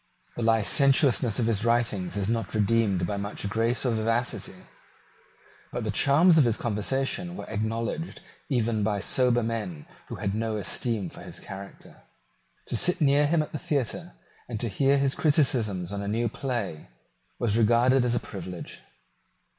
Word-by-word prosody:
The - - -4
licentiousness 120 +1 +4
of 120 - +1
his 110 -2 0
writings 115 -5 0
is 100 -1 -1
not 115 -2 -2
redeemed 105 -4 +2
by 100 +3 -3
much 100 0 -4
grace 115 +5 0
or 125 - +2
vivacity; 115 +2 -2 1.1
but - - -4
the - - -1
charms 160 +4 +5
of - - +6
his 115 -3 +1
conversation 135 - -2
were - - -6
acknowledged 115 +9 -3 0.3
even 115 -5 0
by 105 -1 0
sober 120 +3 +2
men 105 -9 -4 0.2
who - - -6
had 100 - -3
no 110 0 -2
esteem 105 -1 -2
for - - -10
his - - -8
character. 100 0 -11 0.7
To - - -2
sit 180 +10 +2
near 145 -1 +4
him 160 0 +2
at - - -10
the 150 - -4
theatre, 130 - -2 0.4
and 115 -3 -4
to 120 - -1
hear 140 +7 +2
his 135 -1 +1
criticisms 115 - +1
on 100 - -3
a 100 - -5
new 115 +3 0
play, 115 - -4 0.5
was 110 -3 0
regarded 120 +3 +4
as 120 -1 +1
a - - +1
privilege. 90 -3 -8
115 Hz, 160 wpm, -26 LUFS, 105-130 Hz, 1.1 s, of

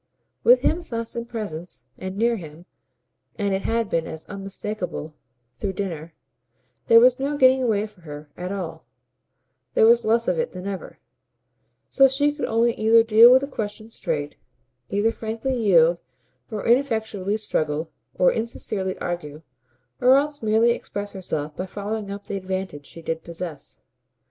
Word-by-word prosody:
With - - +6
him 335 +3 +2
thus 230 -8 -5
in 235 0 -3
presence, 180 - -7
and 190 +1 -6
near 235 +2 +2
him 160 -1 -11 0.7
and 200 -3 -1
it 190 - 0
had 230 +1 0
been 165 -4 -1
as 160 - -8
unmistakeable 195 -4 -5 0.5
through 195 -2 -2
dinner 170 -5 -5 0.7
there 230 - +8
was 250 +2 +5
no 285 +2 -1
getting 260 -1 +5
away 215 -4 +1
for 210 -4 -15
her 150 -2 -9
at 180 +1 -5
all, 190 -4 -5 0.9
there - - +6
was 235 +1 +5
less 230 +2 +2
of - - +1
it 480 - -2
than 180 - -7
ever: 200 -2 -6 0.9
so 270 -1 +5
she 290 +2 +1
could - - -3
only 230 +1 +2
either 225 +1 +5
deal 225 +2 +8
with 260 +1 +6
the 275 - -3
question 220 -3 -6
straight, 145 -8 -3 0.6
either 205 +3 +1
frankly 230 +4 -3
yield 175 -7 +4 0.5
or 215 -2 -5
ineffectually 220 -5 +1
struggle 155 -6 -2 0.2
or 180 - +4
insincerely 210 -4 -3
argue, 155 -3 -5 0.6
or 255 +2 +6
else 290 +1 -1
merely 220 +2 +3
express 205 -3 -4
herself 155 -6 -4
by 185 - -4
following 205 +2 -4
up 200 0 -7
the 200 - -4
advantage 185 -6 -5
she 165 - -11
did 160 0 -3
possess. 170 -3 -7
205 Hz, 160 wpm, -23 LUFS, 180-230 Hz, 0.9 s, there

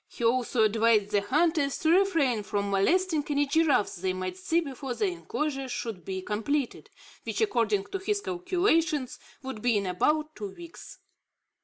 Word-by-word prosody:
He - - -8
also 235 0 +2
advised 215 -1 +3
the 205 -1 +2
hunters 290 - +1
to 315 - +1
refrain 330 - +3
from 200 -1 -2
molesting 320 - +2
any 290 0 +2
giraffes 285 - +2
they 185 +1 -1
might 185 0 -4
see 320 - 0
before 270 -5 -5
the 420 - 0
inclosure 300 -7 -3
should 225 -7 -5
be 190 +1 -5
completed, 240 +7 -2 0.3
which, - - -4
according 230 - +1
to 390 - -2
his 405 +2 -1
calculation, 355 - +1 0.4
would 260 -5 -6
be 240 -2 +2
in 200 - -1
about 305 +12 0
two 205 -2 -7
weeks. 340 -1 -11
265 Hz, 160 wpm, -28 LUFS, 210-330 Hz, 0.4 s, advised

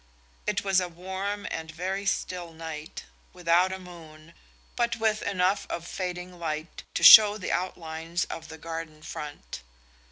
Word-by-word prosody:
It 200 -1 0
was 195 -1 +3
a 180 - -2
warm 190 +4 -5
and 160 0 -5
very 190 +5 -3
still 175 -3 -2
night, 160 -1 -7 0.3
without 180 +1 +3
a 190 - -3
moon, 165 -3 -13 0.4
but 235 -1 +1
with 220 -1 0
enough 185 +1 0
of 170 - -4
fading 180 -1 -5
light 155 0 -4
to - - -1
show 210 -1 +11
the 185 - -4
outlines 165 -1 -2
of 165 -1 -7
the 160 0 -10
garden 160 -1 -7
front. 150 -2 -7
175 Hz, 150 wpm, -27 LUFS, 160-190 Hz, 0.4 s, show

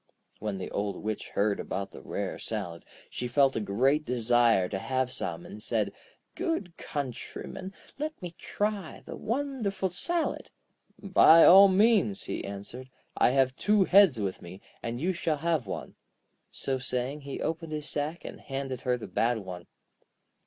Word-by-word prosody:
When 105 -2 -3
the 95 - -6
Old 100 0 -2
Witch 110 0 -3
heard 100 0 0
about 100 0 -4
the 65 - -11
rare - - -4
salad, 85 -1 -5 0.3
she 125 - -3
felt 135 +2 +3
a - - +1
great 130 +9 +2
desire 120 -6 +3
to 95 +1 -3
have 130 +2 -1
some, 85 -7 -4
and 105 - -9
said: 105 -3 0 0.4
'Good 330 - -2
countryman, 145 +7 -6 0.3
let 310 +1 -3
me 175 -2 -7
try 205 -5 -3
the - - -7
wonderful 230 -6 -2
salad!' 335 - -1 0.5
'By 185 -5 +7
all 195 +2 +10
means,' 195 - +3
he - - -4
answered. 100 +6 -7 0.3
'I - - +5
have 130 0 +2
two 210 +4 +3
heads 185 - +6
with 95 -2 -3
me, 90 +2 -10 0.2
and 115 +1 -4
you 180 +6 0
shall 165 -3 -1
have 160 -3 0
one.' - - -5 0.6
So 135 -1 -3
saying, 130 +3 -3
he 140 -1 -6
opened 165 -1 -3
his 150 -1 -3
sack, 150 +3 -3
and - - -8
handed 135 -1 -4
her 125 -1 +1
the 115 - -7
bad 120 +1 +1
one. 90 -4 -8
135 Hz, 160 wpm, -29 LUFS, 110-180 Hz, 0.6 s, all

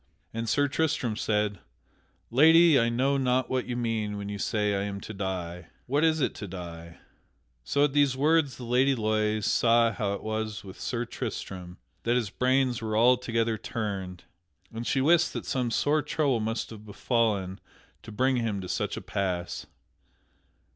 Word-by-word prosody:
And 115 0 -3
Sir 145 +5 +3
Tristram 145 -6 0
said: 105 -2 0 0.7
"Lady, 160 +4 +6
I 115 0 +2
know 135 +4 +1
not 130 -1 +1
what 130 -1 -1
you 120 -1 -3
mean 110 -3 -2
when 100 0 -5
you 100 0 -5
say 105 0 0
I 100 - 0
am 100 0 -4
to 110 - -7
die. 90 -4 -4 0.2
What 140 +5 +1
is 160 -1 +3
it - - +1
to 105 - -6
die?" 85 -2 -8 0.7
So 140 - +1
at 145 -2 +2
these 145 -3 +3
words 150 -1 +2
the 125 - -8
Lady 130 +3 +3
Loise 110 -2 0
saw 115 0 +4
how 105 -4 -2
it 100 - -6
was 110 -1 -3
with 95 -2 -11
Sir 120 -1 -2
Tristram; 95 -7 -6 0.2
that 120 +1 +1
his 115 -6 0
brains 130 -1 +1
were 110 -1 -1
altogether 115 -2 +2
turned; 95 -6 -4 0.5
and 115 +1 -5
she 135 - +1
wist 170 +4 +4
that - - -5
some 125 -2 -1
sore 145 +6 +2
trouble 145 -4 0
must 110 +2 -3
have 110 -2 -10
befallen 105 -3 -1 0.4
to - - -11
bring 130 +4 +1
him 115 -4 -1
to 90 - -7
such - - -2
a - - -5
pass. 90 -3 -3
115 Hz, 175 wpm, -28 LUFS, 105-130 Hz, 0.7 s, Lady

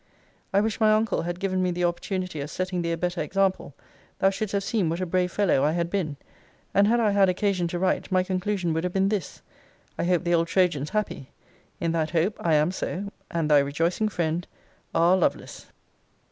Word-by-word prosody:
I 200 - +3
wish 220 0 -1
my 215 -1 +5
uncle 215 -3 +1
had 175 +1 -4
given 185 -1 0
me 180 - +1
the 180 0 -2
opportunity 175 -1 -2
of 140 - -5
setting 185 +1 -2
thee 170 0 -1
a - - -2
better 175 +1 -2
example: 190 -2 0 0.4
thou 195 - +3
shouldst 205 +1 -4
have 200 -1 0
seen 200 -6 0
what 165 +2 -2
a 185 - -1
brave 180 0 0
fellow 185 -10 +2
I 150 +2 +2
had 170 0 -1
been. 160 -8 -2 0.6
And 200 +1 +4
had 235 +2 +3
I 215 -3 +3
had 200 -1 +4
occasion 185 -1 0
to 175 - -3
write, 185 +2 0
my 185 0 +3
conclusion 185 -2 -1
would 160 +1 -1
have 180 0 -2
been 195 0 +2
this: 200 -8 -4 0.6
'I - - 0
hope 175 -1 +2
the 175 -1 +1
old 165 0 +2
Trojan's 170 -6 +1
happy. 210 -10 -3 0.5
In 165 - 0
that 160 -1 0
hope, 175 +5 +1
I 165 -2 +2
am 150 +3 +3
so; 195 +1 -4 0.2
and 165 -2 -1
'Thy 145 - +7
rejoicing 165 +9 0
friend, 170 -2 -2 0.5
'R. 170 +2 +5
LOVELACE.' 180 - -2
180 Hz, 210 wpm, -25 LUFS, 165-195 Hz, 0.6 s, Thy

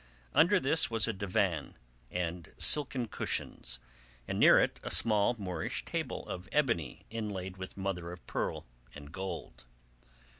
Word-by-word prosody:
Under 195 +5 +6
this 160 +5 +2
was 115 -1 +1
a 115 - 0
divan 95 -3 -1 0.3
and 85 -2 -4
silken 135 -5 +4
cushions, 60 - -3 0.5
and - - -2
near - - +8
it - - +1
a - - -5
small 110 +1 +4
Moorish 90 -6 -3
table - - -3
of 90 0 -6
ebony 115 - 0
inlaid 100 -5 -4
with 95 +1 -8
mother 95 -3 -3
of 90 - -11
pearl - - -2 0.3
and 75 0 -10
gold. 95 -6 -6
95 Hz, 140 wpm, -32 LUFS, 90-115 Hz, 0.5 s, near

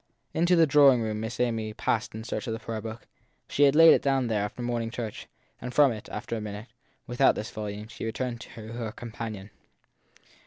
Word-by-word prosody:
Into 175 +2 +3
the 165 -1 +6
drawing 140 -4 +6
room 110 -1 -2
Miss 110 +2 -5
Amy 115 -3 -1
passed 110 -1 -1
in 110 - -6
search 120 - -4
of 115 - -1
the 115 - -4
prayer 110 -1 -5
book 110 +1 -8 0.4
she 145 - +3
had 140 +1 +4
laid 165 +1 +8
down 135 -2 +1
there 105 -2 +1
after 105 +4 -5
morning 120 -1 -1
church, 115 -3 -6 0.3
and 125 - -5
from 140 +1 +5
it, 110 -2 -7
after 115 +2 -4
a 110 - -4
minute, 105 +2 -7 0.4
without 125 +3 +3
this 105 - -5
volume, 105 0 -6
she 115 - -9
returned 120 +1 -3
to - - -10
her 115 0 -6
com, 120 -1 -8
panion. 105 -3 -6
115 Hz, 205 wpm, -27 LUFS, 110-125 Hz, 0.4 s, laid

